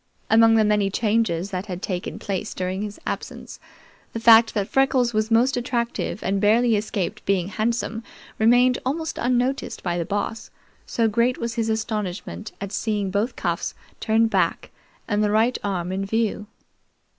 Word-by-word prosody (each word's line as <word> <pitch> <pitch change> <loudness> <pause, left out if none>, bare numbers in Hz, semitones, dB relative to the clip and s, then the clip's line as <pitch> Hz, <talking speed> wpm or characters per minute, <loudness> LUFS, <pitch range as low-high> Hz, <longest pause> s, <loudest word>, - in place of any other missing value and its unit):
Among 225 0 +6
the 220 -1 +4
many 210 -1 +2
changes 205 -4 0
that 185 +2 -4
had 180 -1 -6
taken 180 -2 -4
place 200 +1 -4
during 185 +1 -3
his 210 -1 -6
absence, - - -6 0.5
the 230 - -3
fact 225 0 +6
that 200 -2 0
Freckles 260 -3 +2
was 215 +1 0
most 240 +4 +3
attractive 240 -3 -2
and 195 +1 0
barely 225 +2 +4
escaped 205 -3 -3
being 190 -2 0
handsome 225 +1 -2 0.4
remained 245 +3 +4
almost 320 +5 -3
unnoticed 250 +2 -1
by 175 -1 -1
the - - 0
Boss, 205 +4 -3 0.4
so 230 -1 +1
great 235 +3 +1
was 235 0 -3
his 225 -2 -1
astonishment 215 -2 -3
at 200 -1 -5
seeing 210 -3 -1
both 205 +6 -1
cuffs - - -2 0.2
turned 225 0 +2
back - - 0 0.4
and 210 -1 +1
the 210 - +2
right 225 +4 +2
arm 185 -3 -2
in 190 +1 -2
view. 210 0 -1
220 Hz, 160 wpm, -23 LUFS, 200-235 Hz, 0.5 s, Among